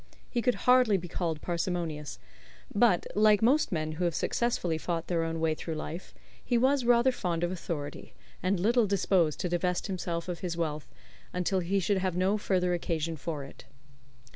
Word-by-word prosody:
He 240 - 0
could 250 +1 +2
hardly 250 -5 +5
be 175 -1 -6
called 165 -3 -3
parsimonious, 170 -4 -3 0.6
but, 205 -4 +3
like 210 +1 +4
most 280 +7 +3
men 155 -3 -1
who 170 +3 -2
have 170 -2 0
successfully 180 -9 0
fought 170 0 -2
their 170 -2 0
own 165 0 -2
way 160 -1 +2
through 160 +1 -5
life, 160 +3 -6 0.3
he 240 - +1
was 260 +1 +3
rather 240 +2 +5
fond 175 -8 -2
of 175 - 0
authority, 155 -5 -6 0.3
and 185 0 +1
little 230 +4 +3
disposed 185 -5 +2
to 180 - -1
divest 175 +1 0
himself 175 -3 -3
of 175 -2 -4
his 175 -2 -4
wealth 155 -3 -3 0.4
until 180 +1 0
he 185 +3 0
should 195 +2 +1
have 185 -2 -1
no 195 +3 +2
further 180 -3 +1
occasion 165 -2 -2
for 155 -1 -4
it. 135 - -12
180 Hz, 180 wpm, -29 LUFS, 165-205 Hz, 0.6 s, hardly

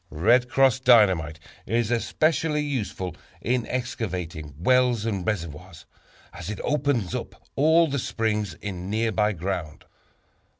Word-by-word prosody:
"Red 120 +11 +3
Cross" 135 -1 +3
Dynamite 95 - +4 0.3
is 115 0 0
especially 150 +5 +1
useful 105 - -3 0.2
in 120 0 -1
excavating 90 - -4
wells 125 +4 +2
and 100 -5 -2
reservoirs, 85 -3 -5 0.5
as 85 +2 -7
it 105 - -5
opens 140 - 0
up - - -7
all 160 +4 +5
the 140 -1 -2
springs 105 -3 -2
in 95 -2 -6
nearby 110 0 +1
ground. 85 -3 -4
110 Hz, 120 wpm, -25 LUFS, 90-125 Hz, 0.5 s, all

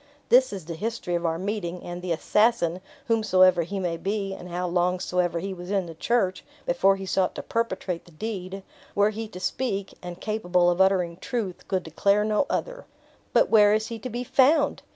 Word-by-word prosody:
"This 255 +1 +5
is 190 -5 -6
the 170 - -5
history 215 +1 -4
of 170 0 0
our 165 0 -1
meeting; 185 -2 -4
and 175 0 -6
the 180 -1 -4
assassin, 185 0 +2 0.2
whomsoever 185 -7 +4
he 195 +5 -4
may 175 -3 -2
be, 195 +1 -2
and 180 -1 -9
how 180 +1 -2
long 180 +1 +1
soever 180 -2 0
he 195 +3 -3
was 180 0 -9
in 195 -2 0
the 165 - -8
church, 190 +1 0 0.2
before 190 +3 +3
he 195 0 -6
sought 190 -1 0
to - - -5
perpetrate 190 -6 -2
the 175 - -17
deed 195 +1 -5 0.3
were 205 +1 +3
he 220 +1 -5
to 180 -4 -10
speak, 200 -2 -2
and 175 0 -8
capable 180 -5 +1
of 175 +2 +1
uttering 180 -3 +2
truth, 205 -3 -4
could 185 -2 -1
declare 200 +6 +2
no 215 +6 +1
other." - - -3 0.5
"But - - +3
where 210 -1 +6
is 215 0 -2
he 230 -1 -5
to 255 - -6
be 240 +1 -4
found?" 285 +4 +3
190 Hz, 200 wpm, -25 LUFS, 175-215 Hz, 0.5 s, where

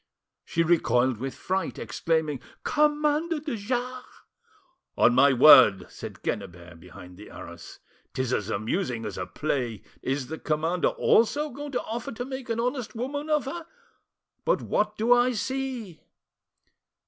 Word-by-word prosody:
She 165 - 0
recoiled 130 -7 +2
with 135 +4 -5
fright, 190 +1 -2
exclaiming— 150 +5 -1 0.2
"Commander 300 +2 +1
de 295 -4 -4
Jars!" 250 +4 -3 0.9
"On 120 - +5
my 140 +3 +6
word!" 125 -8 +8
said - - -9
Quennebert 85 -1 -5
behind 90 +1 -13
the 105 - -12
arras, 85 0 -10 0.3
"'tis 130 -1 -2
as 105 -3 -1
amusing 115 - -2
as 105 -3 -5
a 90 - -4
play! 125 -8 -3 0.2
Is 135 0 -2
the 160 +4 -7
commander 160 +3 0
also 295 +7 +2
going 285 +2 -7
to 245 - -1
offer 230 +2 -5
to 245 +2 -5
make 260 -2 -7
an 230 0 -1
honest 250 0 -2
woman 285 +6 -4
of 300 -2 +2
her? 335 +4 -6 0.8
But - - +1
what 210 0 0
do 230 +3 +4
I 245 +1 +3
see?" 250 -6 -4
190 Hz, 145 wpm, -26 LUFS, -, 0.9 s, word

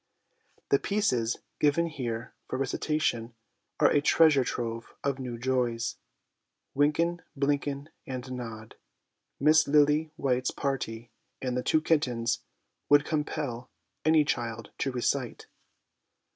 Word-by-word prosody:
The 140 - +4
pieces 125 - +1 0.2
given 150 +3 +3
here 125 -7 -4
for - - -3
recitation 130 -3 -1 0.4
are - - +5
a 145 - +4
treasure 150 -2 +5
trove 115 -2 -4
of 140 -1 -1
new 125 -2 -4
joys. 120 -2 0 0.4
' - - -54
Winken, 165 +5 +2 0.2
Blinken, 140 0 0 0.2
and 130 0 -5
Nod,' 115 -3 -7 0.3
' - - -54
Miss 155 +2 +5
Lily 150 +2 +4
white's 130 -1 +1
Party/ 120 -5 -3 0.3
and 125 -1 -2
'The 125 - 0
Two 155 - +2
Kittens/ 125 -8 +1 0.5
would 145 0 +6
compel 150 -5 -3 0.3
any 155 -1 +5
child 115 -5 -3
to 135 - 0
recite. 125 0 -1
135 Hz, 120 wpm, -29 LUFS, 120-150 Hz, 0.5 s, would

